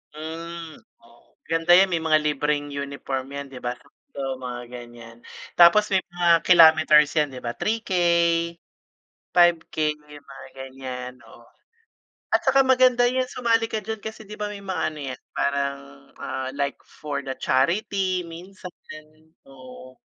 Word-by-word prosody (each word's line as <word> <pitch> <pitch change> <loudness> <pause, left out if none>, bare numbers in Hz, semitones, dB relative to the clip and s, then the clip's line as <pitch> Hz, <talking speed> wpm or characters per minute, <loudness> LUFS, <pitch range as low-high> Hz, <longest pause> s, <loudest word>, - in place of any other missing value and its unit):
Hmm, 165 +1 -8 0.2
oh. 120 0 -24
Ganda 165 +1 +1
'yan 190 +1 +5
may 170 - +1
mga 155 -1 +3
libreng 150 0 -1
uniform 140 -2 -5
'yan, 140 0 -6
'di 130 - -9
ba, 125 0 -2 0.4
sa 140 - -5 0.2
mga 125 -1 -6
ganyan? 120 -1 -11 0.4
Tapos 175 +5 +7
may 190 -1 +2
mga 175 -1 -3 0.2
kilometers 160 -3 +6
'yan, 150 -1 +3
'di 125 - -9
ba? 120 - -2
3K, 220 -1 -3 1.4
5K, 175 -2 +3 0.2
yung 150 -1 -16
mga 135 -1 -12
ganyan, 130 -1 -7
oo. 120 - -17 0.8
At - - +2
tsaka 270 0 +4
maganda 255 -2 +4
'yan, 255 +1 0
sumali 230 -2 +1
ka 220 - -1
diyan 220 +2 -5
kasi 220 0 -7
'di 210 - -9
ba 210 - -2
may 200 -1 -8
mga 190 -1 -3
ano - - -10
'yan 130 -2 -6
parang, 140 0 -1 0.4
ah, 130 0 -4
like 140 0 -2
for 150 -1 -6
the 135 -1 -5
charity 185 +6 0
minsan, 180 +3 -10 0.8
oo. 130 -1 -13
155 Hz, 145 wpm, -24 LUFS, 135-190 Hz, 1.4 s, Tapos